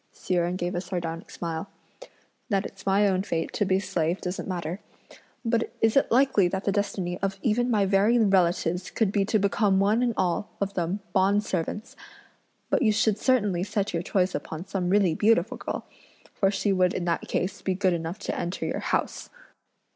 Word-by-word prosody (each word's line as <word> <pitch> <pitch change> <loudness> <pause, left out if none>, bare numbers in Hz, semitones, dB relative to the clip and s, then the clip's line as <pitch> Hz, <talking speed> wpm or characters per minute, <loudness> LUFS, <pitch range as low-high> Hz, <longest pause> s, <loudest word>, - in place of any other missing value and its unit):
Hsi - - -3
Jen 175 0 +1
gave 175 -1 -2
a 175 - -1
sardonic 175 -2 -5
smile. 165 +1 -5 0.8
"That 200 -2 +1
it's 195 0 -10
my 200 +2 +4
own 185 -1 +1
fate 165 -4 -3
to 205 - +1
be 185 - +2
a - - +2
slave 170 -2 -1
doesn't 180 +1 -4
matter, 175 -1 -3 0.7
but 230 0 0
is 225 -1 +2
it 275 - +3
likely 245 -6 +4
that 190 +2 -3
the 200 - +1
destiny 190 -3 -2
of 195 0 -2
even 240 +2 +1
my 210 -4 +3
very 200 +5 +3
relatives 180 -4 +2
could 220 -4 0
be 200 -1 +1
to 215 - +2
become 200 -1 +2
one 210 +4 +3
and 240 -2 +1
all 185 +2 0
of 200 0 -2
them 185 +2 -2
bond 200 +2 +3
servants? 200 +3 -3 0.8
But - - +3
you 220 -5 +4
should 220 -1 +1
certainly 205 -10 +2
set 205 0 -2
your 165 - 0
choice 185 +1 0
upon 160 +3 -5
some 185 -2 -2
really 195 -3 +3
beautiful 215 +1 +2
girl, - - -5 0.5
for 195 - +2
she 200 0 0
would 185 -1 +2
in 175 - -2
that 170 -1 -1
case 185 - -2
be 190 - -1
good 190 -1 +2
enough 165 +2 -3
to - - -2
enter 175 +3 -3
your - - -2
house." - - -2
195 Hz, 195 wpm, -26 LUFS, 175-210 Hz, 0.8 s, my